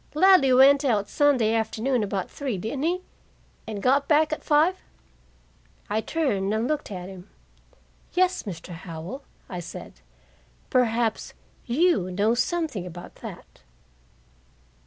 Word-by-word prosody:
"Ladley 365 -5 +6
went 275 +3 +6
out 215 -7 +1
Sunday 260 -7 +2
afternoon 225 +3 0
about 195 -2 -2
three, 265 -8 -3
didn't 225 +9 -4
he 350 +4 0 0.7
and 210 -3 -5
got 275 +2 +3
back 310 0 +3
at - - -5
five?" 315 +5 +3 1.1
I 215 +1 +1
turned 215 -11 -1
and 225 +2 0
looked 305 0 -2
at 180 -3 -6
him. 190 0 -11 0.8
"Yes, 370 0 +2
Mr. 180 -4 -8
Howell," 170 - -7 0.3
I 180 - -6
said. 170 - -9 0.7
"Perhaps 230 -2 +1 0.3
you 255 - +2
know 205 +5 +1
something 270 - -1
about 175 0 -10
that." - - -11
240 Hz, 125 wpm, -25 LUFS, 200-295 Hz, 1.1 s, Ladley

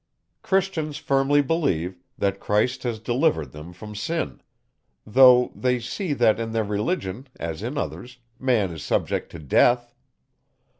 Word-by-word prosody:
Christians 180 -6 0
firmly 140 +1 +2
believe, 95 - -1 0.2
that 100 0 0
Christ 110 +5 +1
has 120 -3 -2
delivered 120 - 0
them 75 +3 -10
from 105 +4 -10
sin; 105 - -3 0.6
though 125 +2 +6
they 125 -1 0
see, 155 - -3
that, 120 -5 +3
in 115 -1 -3
their 110 -1 +1
Religion, 105 - -2
as 85 +1 -4
in 125 +7 -4
others, 125 -3 -5 0.2
man 115 -8 +1
is 80 -2 -7
subject - - -1
to - - -6
Death. 120 - +2
120 Hz, 140 wpm, -24 LUFS, 100-135 Hz, 0.6 s, though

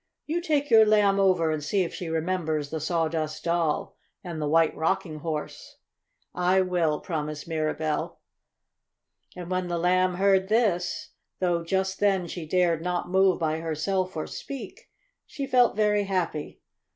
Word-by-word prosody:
"You 335 +3 -1
take 295 -5 0
your 220 -1 +8
Lamb 205 -2 +3
over 180 -5 +3
and 155 -1 -3
see 195 +5 +1
if 170 - -5
she 175 - -5
remembers 160 -3 -1
the 160 - -2
Sawdust 160 -1 -2
Doll 170 -3 0 0.3
and 170 -4 -5
the 150 - -1
White 165 0 +3
Rocking 165 -1 -1
Horse." 155 -1 -5 0.6
"I 180 +1 +2
will!" 175 -5 0
promised 150 -3 -4
Mirabell. 155 -1 -2 1.2
And 180 0 -7
when 185 0 -1
the 175 -1 -2
Lamb 180 +1 +2
heard 190 0 +3
this, 205 -6 0 0.3
though 175 -2 0
just 190 +2 -1
then 195 -3 +2
she 170 -2 -6
dared 170 -1 +2
not 180 0 -2
move 190 -1 +4
by 160 -1 -1
herself 175 +3 -2
or 155 - -2
speak, 255 -8 -8 0.4
she 280 - -5
felt 250 -4 +3
very 210 -1 +2
happy. 180 -6 -3
180 Hz, 150 wpm, -26 LUFS, 160-190 Hz, 1.2 s, your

